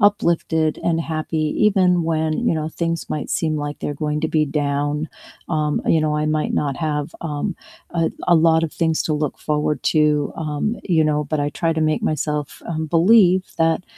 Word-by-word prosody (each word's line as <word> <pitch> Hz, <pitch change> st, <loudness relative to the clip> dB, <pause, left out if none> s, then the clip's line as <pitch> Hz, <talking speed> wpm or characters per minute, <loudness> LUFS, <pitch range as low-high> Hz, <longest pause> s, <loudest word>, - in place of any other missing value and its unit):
uplifted, 170 Hz, -5 st, +2 dB
and 165 Hz, -1 st, +1 dB
happy 160 Hz, 0 st, -3 dB, 0.3 s
even 185 Hz, -4 st, +3 dB
when, 160 Hz, +6 st, 0 dB
you -, -, +3 dB
know, 155 Hz, 0 st, -2 dB
things 165 Hz, 0 st, -3 dB
might 150 Hz, -, -4 dB
seem 155 Hz, -2 st, 0 dB
like 145 Hz, 0 st, -4 dB
they're 145 Hz, -, -3 dB
going 150 Hz, 0 st, -1 dB
to 160 Hz, -, +1 dB
be 155 Hz, -1 st, +2 dB
down, 145 Hz, +1 st, -1 dB, 0.4 s
um, 150 Hz, -2 st, 0 dB
you 160 Hz, -, +4 dB
know, 155 Hz, -1 st, 0 dB
I 150 Hz, 0 st, 0 dB
might 155 Hz, 0 st, 0 dB
not 140 Hz, -2 st, -1 dB
have, 150 Hz, +1 st, -3 dB
um, 150 Hz, -1 st, -3 dB, 0.5 s
a -, -, +3 dB
l -, -, +1 dB, 0.2 s
a 175 Hz, -, +6 dB
lot 160 Hz, 0 st, +3 dB
of 160 Hz, -, -4 dB
things 160 Hz, -2 st, 0 dB
to 155 Hz, -, -1 dB
look 150 Hz, -, -2 dB
forward 150 Hz, 0 st, +1 dB, 0.2 s
to, 150 Hz, -2 st, +2 dB
um, 150 Hz, -1 st, -3 dB, 0.3 s
you 160 Hz, -, +4 dB
know, 150 Hz, 0 st, +1 dB
but 155 Hz, -2 st, 0 dB
I -, -, 0 dB
try 165 Hz, +2 st, 0 dB
to 160 Hz, -, -2 dB
make -, -, -1 dB
myself, 150 Hz, -1 st, -2 dB
um, 160 Hz, -1 st, -2 dB
believe 185 Hz, 0 st, +5 dB, 0.2 s
that 165 Hz, +2 st, +2 dB
155 Hz, 200 wpm, -21 LUFS, 150-165 Hz, 0.5 s, a